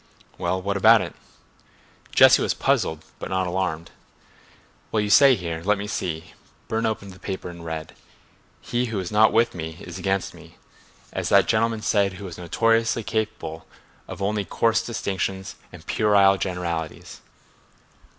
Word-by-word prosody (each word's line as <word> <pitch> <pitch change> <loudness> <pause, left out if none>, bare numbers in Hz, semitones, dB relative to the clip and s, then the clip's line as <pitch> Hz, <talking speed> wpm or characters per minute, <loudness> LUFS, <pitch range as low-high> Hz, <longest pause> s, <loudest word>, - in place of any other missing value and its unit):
'" - - -29
"Well—what 95 +3 -1
about 110 +2 +6
it?" 85 - -7 1.0
Jesse - - +7
was - - 0
puzzled 80 0 0
but - - -6
not 95 0 0
alarmed. 90 -3 -2 1.0
"Well, 110 - +1
you 105 -1 -1
say 135 +4 +7
here—let 90 +2 -1
me 100 - -5
see." 90 -4 -4 0.3
Burne 115 0 0
opened 100 -3 -4
the 95 - -16
paper 95 -2 -5
and 85 -1 -11
read: 80 -1 -6 0.7
"'He 120 +1 -1
who 115 -3 -4
is 90 -2 -5
not 110 +1 +5
with 115 +1 +2
me 80 -1 -6
is 90 +1 -8
against 95 +1 -1
me, - - -16 0.6
as - - -2
that - - +5
gentleman 110 0 +1
said 100 -2 +2
who 100 +2 -9
was 90 -2 -8
notoriously 115 +6 +1
capable 110 -7 -4 0.4
of 100 - -6
only 105 +1 0
coarse 115 +3 +1
distinctions 95 -4 -3 0.2
and - - -13
puerile 100 -2 +4
generalities. 85 -4 -4
95 Hz, 150 wpm, -24 LUFS, 90-110 Hz, 1.0 s, Jesse